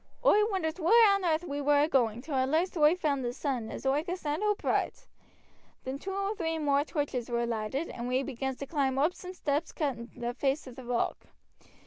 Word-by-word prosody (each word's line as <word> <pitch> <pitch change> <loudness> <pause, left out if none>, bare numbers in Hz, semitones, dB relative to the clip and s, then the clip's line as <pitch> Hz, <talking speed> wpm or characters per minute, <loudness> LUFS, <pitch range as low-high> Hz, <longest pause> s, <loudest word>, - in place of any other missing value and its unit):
Oi 420 - +6
wonders 365 -4 -2
whar 345 +5 +3 0.2
on 395 0 +2
aarth 325 -1 +1
we 285 0 -3
war 290 0 +4
agoing, 240 -5 +1
till 300 - -6
at 260 0 +1
last 335 +6 +1
oi 305 +1 +5
found 290 -6 0
sudden 255 -7 -2
as - - -7
oi 275 +3 +2
could 355 +2 -3
stand 300 0 -2
oopright. 425 +4 0 0.8
Then 265 +1 -4
two 385 - -5
or 395 +2 -1
three 325 -3 -2
more 285 -2 +2
torches 285 -6 -3
war 235 0 0
lighted, 235 +7 -2
and 240 0 -5
we 255 +2 +1
begins 265 -1 -3
to 275 - -5
climb 275 -3 0
oop 305 +6 +3
some 365 0 -9
steps 300 -1 -1
cut 280 -7 -2
i' 235 - -7
the 240 0 -3
face 275 +3 0
of 255 -3 -10
t' 260 - -9
rock. 245 -1 -2
285 Hz, 210 wpm, -30 LUFS, 260-325 Hz, 0.8 s, Oi